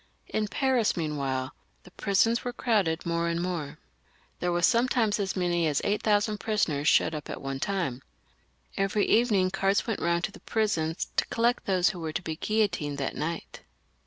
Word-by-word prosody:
In 215 -1 -1
Paris, 250 -1 +1
meanwhile, 140 -5 -2 0.3
the 180 - -16
prisons 215 +5 +1
were 245 - -3
crowded 200 -10 0
more 170 0 0
and 170 0 -1
more. 175 -5 -3 0.6
There 180 - 0
were 175 0 0
sometimes 235 -3 +3
as 195 -1 -1
many 175 -3 +1
as 145 -2 +1
eight 205 +1 0
thousand 210 0 +1
prisoners 165 -10 0
shut 160 - +4
up 150 -1 -6
at - - -5
one 135 0 -4
time. 170 -9 -2 0.7
Every 195 +1 +1
evening 210 -6 +3
carts 195 +1 +1
went 225 -4 -2
round 170 0 +1
to 180 - -1
the - - -13
prisons 175 -8 -1
to - - +2
collect 235 +1 +1
those 185 -2 +3
who 180 - -6
were 160 -2 -4
to - - -2
be 160 -2 -3
guillotined 175 -8 0
that 140 - -3
night. 165 +2 -4
185 Hz, 180 wpm, -28 LUFS, 160-215 Hz, 0.7 s, shut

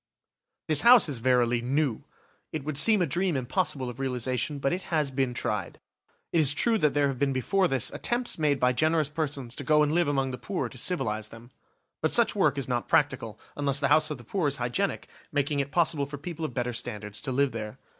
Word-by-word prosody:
This 155 -2 +4
house 240 -4 +7
is 140 -6 -3
verily 120 -1 +2
new; 135 -1 0 0.5
it 155 - -4
would 155 0 -4
seem 210 +2 +5
a - - +2
dream 170 +1 0
impossible 130 0 -1
of 125 +1 -8
realisation, 130 +2 -2
but 135 +2 -1
it 185 - -3
has 150 -4 0
been 130 -2 -1
tried. 105 -6 -3 0.5
It 170 - +3
is 145 -2 +5
true 225 +5 +2
that 150 -4 +1
there 145 -1 +3
have 135 -3 -4
been 140 -1 +1
before 185 - +1
this 135 -7 0
attempts 240 -6 -2
made 145 -3 +1
by 125 0 +3
generous 155 +2 +1
persons 140 -5 -4
to 145 - -4
go 150 +2 +4
and 150 - 0
live 170 0 +2
among 135 -2 0
the 125 - -6
poor 120 +1 -3
to 130 - -13
civilise 110 - -1
them. 115 +2 -14 0.5
But 155 - +1
such 235 -2 +3
work 150 -8 +2
is 135 - -2
not 120 -2 -2
practical, 130 -7 0 0.2
unless 140 -1 0
the 140 -1 0
house 155 +1 +4
of 150 - -4
the 120 - -13
poor 165 - -1
is 140 - -1
hygienic, 125 +12 -2 0.2
making 145 -1 0
it 140 0 -1
possible 155 -3 +1
for 145 +1 -7
people 165 +2 -6
of 130 - -5
better 125 -1 -2
standards 105 -3 -5
to 135 - -4
live 140 +1 +1
there. 110 +1 -6
140 Hz, 225 wpm, -27 LUFS, 125-155 Hz, 0.5 s, house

